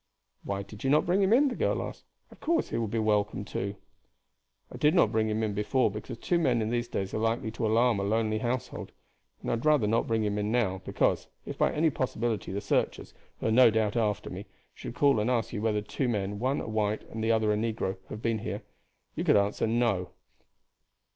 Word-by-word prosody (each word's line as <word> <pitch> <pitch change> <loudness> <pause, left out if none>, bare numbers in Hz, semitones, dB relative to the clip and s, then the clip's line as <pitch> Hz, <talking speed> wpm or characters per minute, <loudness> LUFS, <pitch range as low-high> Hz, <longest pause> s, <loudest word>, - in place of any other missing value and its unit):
"Why 100 0 -3
did 105 +2 -12
you 135 - +1
not 150 +2 +4
bring 185 +3 +2
him 195 +1 +3
in?" 275 +5 +5
the 245 - -4
girl - - 0
asked. - - -8 0.3
"Of - - -16
course 335 +1 0
he - - -1
will 115 - -1
be 115 - -3
welcome 105 -2 +1
too." 100 +1 -4 1.0
"I - - -8
did 150 +1 +3
not 105 - +4
bring 110 -1 +1
him 110 +1 0
in 105 -2 -1
before 105 +3 +1
because 110 +3 -7
two 175 +8 0
men 130 -7 +2
in 110 0 -1
these 120 0 -1
days 95 -5 -3
are - - -1
likely 115 0 0
to 110 0 -2
alarm 115 0 +3
a - - -1
lonely 110 +1 +1
household; 120 +1 -3 0.5
and - - -1
I - - +2
would 115 - -2
rather 150 -7 +4
not 115 +2 +1
bring 115 -1 +1
him 105 0 -1
in 105 +1 -1
now, 100 -6 +1
because, - - +1 0.2
if - - -5
by - - +3
any 155 +1 +2
possibility 115 -7 -2
the 100 +1 -3
searchers, - - -1 0.3
who - - -5
are 110 - +2
no 125 +1 +7
doubt 110 -1 0
after 105 -4 0
me, 100 +3 -7 0.3
should - - -8
call 140 -5 +4
and 105 +3 0
ask 120 -2 0
you 105 - -3
whether 105 -2 0
two 125 +4 -2
men, 100 -2 -2
one 130 +4 0
a - - -6
white 110 -1 -1
and 110 0 -4
the 115 - +2
other 110 -2 +2
a - - +1
negro, 105 -3 -2
had 105 - -7
been 115 -1 +1
here, - - -5 0.5
you - - -3
could - - +5
answer 100 +2 +1
no." 110 -6 +1
110 Hz, 235 wpm, -29 LUFS, 105-120 Hz, 1.0 s, no